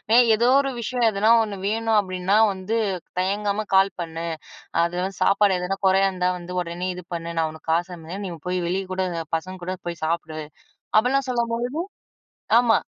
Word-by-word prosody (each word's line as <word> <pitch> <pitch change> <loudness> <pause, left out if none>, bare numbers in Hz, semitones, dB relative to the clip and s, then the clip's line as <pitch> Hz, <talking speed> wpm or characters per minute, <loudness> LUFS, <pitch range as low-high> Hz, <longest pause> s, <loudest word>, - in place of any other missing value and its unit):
ஏன் 245 -1 +7
ஏதோ 235 +3 +2
ஒரு 275 -1 0
விஷயம் 235 0 +1
"எதுனா 210 +2 +1
ஒன்னு 210 -2 -4
வேணும் 225 0 +1
அப்டின்னா 185 +1 0 0.2
வந்து, 190 +5 -2 0.4
தயங்காம 205 +2 0
கால் 195 +1 +4
பண்ணு. 165 0 -5 0.6
அதுல 175 +1 -1
வந்து 195 -1 -6
சாப்பாடு 195 -1 +4
எதனா 190 +2 -2
கொறயா 195 +1 +4
இருந்தா, 180 -1 0
வந்து 180 +1 -7
உடனே 175 +2 -4
இது 180 - -8
பண்ணு. 170 0 -5
நான் 160 -1 +1
உனக்கு 160 +1 -11
காசு 175 +2 0
அனுப்புற, 170 +4 -8
நீ - - -5 0.2
போய் 180 0 0
வெளிய 190 +2 -1
கூட 190 0 0 0.3
பசங்க 185 +3 -8
கூட 185 +1 -2
போய் 170 -2 -5
சாப்பிடு." 160 -1 -2 0.6
அப்டிலாம் 265 +3 +1
சொல்லும்போது 235 0 0 1.0
ஆமா. 230 -2 +4
190 Hz, 170 wpm, -24 LUFS, 175-215 Hz, 1.0 s, ஏன்